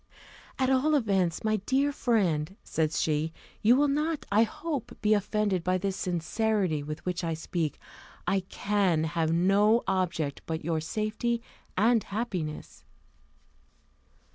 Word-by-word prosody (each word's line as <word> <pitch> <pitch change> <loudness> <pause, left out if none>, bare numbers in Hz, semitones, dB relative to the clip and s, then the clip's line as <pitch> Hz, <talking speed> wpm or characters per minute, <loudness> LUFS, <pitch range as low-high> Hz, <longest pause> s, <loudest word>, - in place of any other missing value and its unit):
"At 260 0 +2
all 285 +4 +3
events, 195 - +1
my 215 0 +2
dear 265 +8 +1
friend," 195 - +1
said 155 -1 0
she, 155 +1 0 0.3
"you 230 +4 +6
will 290 +2 +4
not, 300 +2 -1
I 210 +2 +5
hope, 280 +4 -3
be 215 0 +3
offended 205 -3 0
by 185 +1 +2
the 195 +1 -1
sincerity 185 -1 0
with 150 +1 -7
which 180 0 -2
I 165 -1 -1
speak 160 -1 -2 0.5
I 195 - +2
can 190 -3 0
have 160 0 0
no 200 +7 +4
object 170 -6 -1
but 160 -2 -3
your 165 -1 0
safety 215 +7 -1 0.4
and 225 +3 +4
happiness." 195 -8 -4
195 Hz, 135 wpm, -28 LUFS, 165-225 Hz, 0.5 s, you